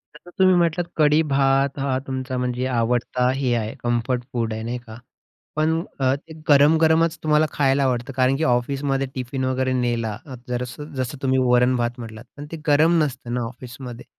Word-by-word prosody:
आता 175 +4 -15
तुम्ही 185 -1 +6
म्हटलात, 170 0 +1
कढी-भात 140 -3 +3
हा 135 -1 0
तुमचा 130 -1 -3
म्हणजे 125 0 -1
आवडता 125 +1 0
हे 130 -3 0
आहे, 110 -1 -2
कम्फर्ट 120 +1 0
फूड 115 -2 -1
आहे 110 0 -5
नाही 120 +2 -3
का? 110 -1 -10 0.6
पण 155 +1 +2 0.3
अ, 130 0 +2
ते 160 +3 -12 0.2
गरम-गरमच 160 +3 +4
तुम्हाला 155 0 +3
खायला 140 -1 +2
आवडतं, 125 0 -1
कारण 130 +1 +3
की 160 - -1
ऑफिसमध्ये 135 +2 0
टिफिन 130 +1 -3
वगैरे 130 0 0
नेला, 120 -4 -1
अ, 130 -3 -8
जरसं 125 +5 -5
जसं 130 +2 -3
तुम्ही 130 -1 +1
वरण-भात 125 0 +2
म्हटलात, 110 0 -8
पण 145 - -7
ते 165 - -5
गरम 160 +4 +4
नसतं 130 -4 -4
ना 125 - -1
ऑफिसमध्ये. 125 0 -9
130 Hz, 170 wpm, -22 LUFS, 125-145 Hz, 0.6 s, तुम्ही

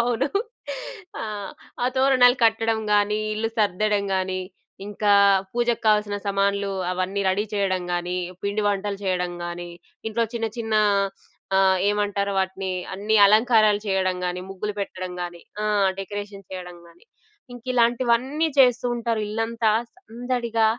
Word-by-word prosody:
అవును. 245 +4 +1 0.9
ఆ! - - -3 0.6
ఆ - - +3
తోరణాలు 260 -2 +5
కట్టడం‌ 225 0 +2
గానీ, 205 +1 +2 0.2
ఇల్లు 225 +1 -1
సర్దడం 210 0 +1
గానీ, 185 0 -1 0.5
ఇంకా 205 0 +1 0.4
పూజకు 240 0 0
కావాల్సిన 210 -1 +3
సమాన్లూ, 200 0 0 0.2
అవన్నీ 185 +2 -2
రెడీ 195 +3 +1
చేయడం 190 -2 0
గానీ, 175 +1 -2 0.3
పిండి 205 +1 0
వంటలు 200 0 -2
చేయడం 180 -2 -1
గానీ, 175 0 -6 0.4
ఇంట్లో 230 +1 0
చిన్న 225 -1 -1
చిన్న 225 -1 -2 0.8
అహ్, 190 -1 +4
ఏమంటారు? 205 -1 0
వాటినీ 190 0 -2 0.2
అన్ని 210 +3 +1
అలంకారాలు 215 -1 +4
చేయడం 190 -2 +1
గానీ, 180 0 -3
ముగ్గులు 200 +2 -4
పెట్టడం 185 -2 -5
గానీ, 175 -1 -6 0.2
ఆ! - - -1 0.3
డెకరేషన్ 200 0 -6
చేయడం 180 -1 -7
గానీ, 170 - -20 0.5
ఇంకిలాంటివన్నీ 245 +4 +1
చేస్తూ 250 -2 +5
ఉంటారు. 230 -2 -1
ఇల్లంతా 225 +1 -1 0.3
సందడిగా 240 - -2
205 Hz, 125 wpm, -24 LUFS, 190-230 Hz, 0.9 s, తోరణాలు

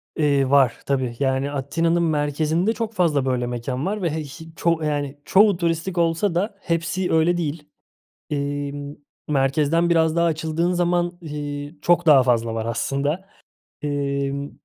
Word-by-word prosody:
Eee, 140 -3 +2
var. 135 -4 +4
Tbii 130 -4 -1
yani 135 0 0
Atina'nın 165 +5 0
merkezinde 155 +5 +1
çok 225 0 -4
fazla 160 -9 +1
böyle 125 -2 0
mekân 125 +3 -3
var 205 +2 -2
ve 170 - +1
he 155 0 -3
ş 160 +4 -10
çoğ 165 -1 0
yani 145 -1 -2
çoğu 200 -1 +5
turistik 170 +1 -1
olsa 170 +2 +1
da 200 +4 -1
hepsi 175 +2 -1
öyle 165 +2 +3
değil. 155 -2 -3 0.7
İii, 145 -1 -2
ımm, 145 0 -7 0.3
merkezden 150 +4 +2
biraz 160 -1 +3
daha 170 0 +3
açıldığın 160 +2 0
zaman, 175 0 0
iii, 145 -1 -6
çok 175 0 +3
daha 140 -4 +7
fazla 115 -2 +1
var 110 0 -3
aslında. 140 +10 -2 0.5
Emm, 140 -1 -2
150 Hz, 150 wpm, -22 LUFS, 140-170 Hz, 0.7 s, daha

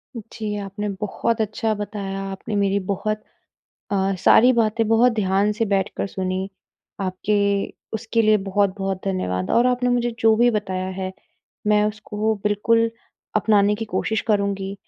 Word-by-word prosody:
जी, 215 -1 -5
आपने 205 +1 -4
बहुत 225 +2 -1
अच्छा 215 +1 -1
बताया, 200 -2 -4
आपने 205 +2 -5
मेरी 200 0 +2
बहुत 215 +2 -2 0.7
अ, 195 -1 +1
सारी 245 +6 +6
बातें 225 -1 +1
बहुत 230 +2 +4
ध्यान 200 -1 +1
से 215 +2 -1
बैठकर 195 0 0
सुनी, 190 0 -3 0.5
आपके 190 +2 -1 0.6
उसके 225 +1 0
लिए 215 0 +5
बहुत-बहुत 195 -1 0
धन्यवाद। 90 - -2
और 240 +2 +4
आपने 250 0 +1
मुझे 240 -1 +1
जो 225 -1 +5
भी 240 +1 +4
बताया 190 -4 -2
है, 185 0 -3 0.5
मैं 210 0 +4
उसको 215 +1 -1
बिल्कुल 230 +2 +2 0.5
अपनाने 210 0 +3
की 225 +2 -4
कोशिश 220 0 -1
करूँगी, 200 -1 0
210 Hz, 140 wpm, -22 LUFS, 195-220 Hz, 0.7 s, सारी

